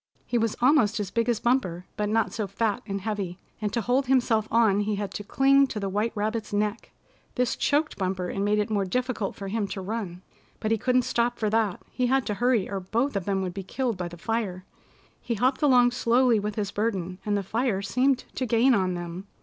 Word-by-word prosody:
He 240 - 0
was 225 -1 0
almost 245 -5 +4
as 200 -2 -3
big 230 +1 0
as 235 -3 +1
Bumper, 210 -9 0
but 210 0 -1
not 225 0 +1
so 215 -3 -2
fat 205 +1 -1
and 195 -1 -3
heavy, 200 -4 -3 0.2
and 210 -1 -1
to 235 +2 0
hold 250 +4 +1
himself 235 -4 +2
on 220 -3 +3
he 205 0 0
had 200 -1 -4
to 205 - -5
cling 275 +5 +4
to 225 - -4
the 200 -1 -2
white 210 +4 0
rabbit's 215 +1 -2
neck. 210 +2 -1 0.5
This 250 -2 +1
choked 300 -2 0
Bumper, 185 -1 -1
and 195 +2 -2
made 205 +1 +2
it 210 +1 0
more 205 -2 +1
difficult 245 +1 -2
for 195 - -6
him 205 +1 -1
to 195 - -5
run. 190 -3 -5 0.4
But 220 - -2
he 225 - +3
couldn't 250 +2 +2
stop 240 +1 0
for 215 -2 -1
that. 220 -4 0
He 250 -1 0
had 265 0 +2
to 210 - -1
hurry, 235 -2 +2
or 195 - -3
both 230 +8 -1
of 195 -3 -1
them 195 -1 0
would 180 -1 -3
be 195 - -5
killed 235 +5 -2
by 180 -1 -4
the 175 0 -10
fire. 185 -2 -3 0.6
He 235 - -2
hopped 255 +5 +1
along 250 -4 +5
slowly 245 -1 +3
with 210 0 -3
his 205 -2 -2
burden, 190 -4 -2
and 205 -1 0
the 200 - -2
fire 220 -1 -1
seemed 255 +6 +1
to 255 - -2
gain 235 +4 +4
on 185 -4 +1
them. 175 +2 -6
215 Hz, 230 wpm, -26 LUFS, 195-245 Hz, 0.6 s, along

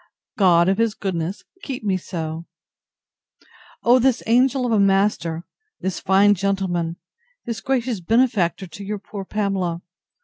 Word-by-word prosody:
—God, 175 -3 +4
of 195 +3 +1
his 230 -2 +1
goodness, 185 -1 -3 0.2
keep 260 -4 -6
me 200 -3 +1
so! 165 -2 -5 1.4
O 245 +2 +5
this 260 -1 +2
angel 250 +3 +3
of 240 - -1
a 220 - +3
master! 195 -4 +1 0.3
this 190 0 -3
fine 200 +2 +4
gentleman! 185 -4 -1 0.5
this 225 -4 -4
gracious 245 -2 -1
benefactor 200 -2 +1
to 185 +3 -10
your 210 +1 -3
poor 200 0 -8
Pamela! 190 -4 -2
195 Hz, 135 wpm, -22 LUFS, 175-225 Hz, 1.4 s, O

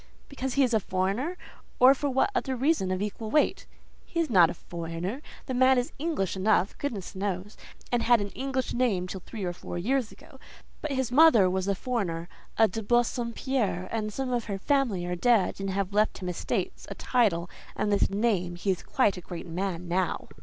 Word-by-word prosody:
"Because 265 -2 -4
he 280 - +5
is 245 -2 +1
a 220 - +4
foreigner? 200 - -1 0.4
or 255 +2 +8
for 285 +1 -2
what 265 +9 +2
other 270 -9 -1
reason 265 - +1
of 185 +1 -1
equal 210 +1 -4
weight?" 300 +7 +1 0.4
"He 335 - -4
is 320 -6 0
not 175 -5 +6
a - - -5
foreigner. 170 - -5 0.2
The 260 - -4
man 260 +1 +5
is 245 +5 0
English 300 - -1
enough, 195 0 +2
goodness 220 -10 -4
knows; 195 +1 -3 0.4
and 240 -1 +2
had 240 0 +4
an 205 0 -3
English 260 +2 -3
name 225 -8 +1
till 190 - -6
three 220 -4 -7
or 175 -1 -2
four 175 - -7
years 245 +6 0
ago; - - -16 0.4
but 305 - -3
his 260 -2 -1
mother 260 -8 +7
was 190 0 -1
a 200 - +1
foreigner, 180 -8 -2 0.3
a 220 - +6
de 220 +3 -5
Bassompierre, 240 -3 0
and 215 -2 -2
some 255 +3 -3
of 240 -2 -1
her 200 -3 -3
family 230 -6 +1
are 180 0 -2
dead 220 +1 +2
and 195 - -2
have 195 0 -2
left 210 +1 +2
him 185 -2 -5
estates, 180 - -3
a - - -6
title, 200 -9 +1 0.3
and 210 - 0
this 200 - +3
name: 195 -4 0
he 190 +3 0
is 180 - -2
quite 210 -8 +1
a - - -6
great 175 0 -7
man 180 0 -3
now." 180 0 -1
215 Hz, 205 wpm, -28 LUFS, 185-255 Hz, 0.4 s, or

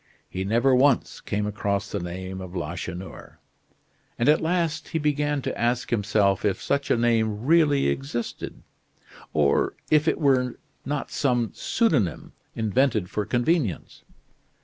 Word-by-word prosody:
He 95 - -4
never 115 +6 +3
once 135 0 +2
came 105 0 -2
across 100 -1 -2
the 100 - -2
name 95 +2 -6
of 95 0 -8
Lacheneur; 90 +2 -6 0.8
and 120 - +1
at 150 +2 +5
last 165 -1 0
he - - -2
began 145 -2 0
to - - -3
ask 120 +1 -1
himself 105 -3 +2
if 100 -3 +1
such 140 0 -1
a - - +3
name 115 -2 +1
really 150 -3 +4
existed, 135 -4 -4 0.7
or 75 -2 +2 0.2
if 155 0 +4
it - - +2
were 130 -4 +2 0.3
not 145 0 -3
some 120 -5 +1
pseudonym 135 - 0 0.2
invented 110 -3 +1
for 105 -1 -2
convenience. 120 - 0
120 Hz, 135 wpm, -25 LUFS, 100-140 Hz, 0.8 s, at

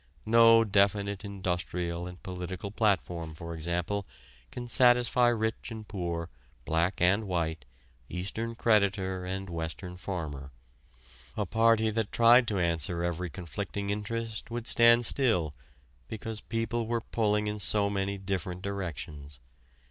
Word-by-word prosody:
No 115 0 +6
definite 100 0 +1
industrial 90 -3 -3
and 90 0 -11
political 95 +1 -6
platform, 90 -7 -1
for 85 +1 -7
example, 85 +5 -2 0.4
can 120 +9 -7
satisfy 120 +1 +4
rich 110 -1 -1
and 110 -2 -8
poor, 85 -4 -4 0.4
black 85 +4 0
and 100 +5 +3
white, 80 -6 -2 0.4
Eastern 110 +6 -4
creditor 100 -5 +1
and 95 +1 -4
Western 85 +2 -6
farmer. 75 -8 -5 0.9
A 105 - 0
party 110 +2 +3
that 110 -1 -2
tried 120 +1 +6
to 105 - -1
answer 85 -1 0
every 85 +1 -2
conflicting 100 +4 -5
interest 110 +2 -4
would 120 0 -5
stand 120 0 +6
still 110 - +4 0.5
because 110 0 -6
people 115 0 -2
were 115 0 -1
pulling 105 -2 0
in 105 0 -3
so 100 +2 +4
many 100 0 -2
different 95 -1 -4
directions. 75 -8 -6
100 Hz, 125 wpm, -29 LUFS, 90-110 Hz, 0.9 s, No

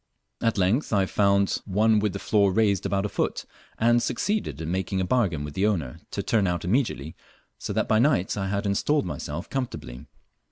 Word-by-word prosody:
At 115 -2 +1
length 100 +10 +1
I 100 -2 +3
found 100 0 +2
one 110 +2 +3
with 105 -1 0
the - - -3
floor 100 0 +2
raised 100 -2 +2
about 100 0 0
a - - +1
foot, - - -2 0.3
and 120 +1 +3
succeeded 205 - -1
in 80 +1 -4
making 95 +1 -1
a 95 - 0
bargain 90 - +1
with 75 0 -6
the 95 +5 +1
owner 80 -12 -2
to - - -4
turn 105 -4 +2
out 85 -1 -2
immediately, 90 - -1 0.4
so - - -4
that - - 0
by 110 - +3
night 120 -8 +2
I 100 -2 -2
had 100 +1 -2
installed 100 +7 +1
myself 75 -6 -5
comfortably. 120 - -5
100 Hz, 195 wpm, -25 LUFS, 90-110 Hz, 0.4 s, I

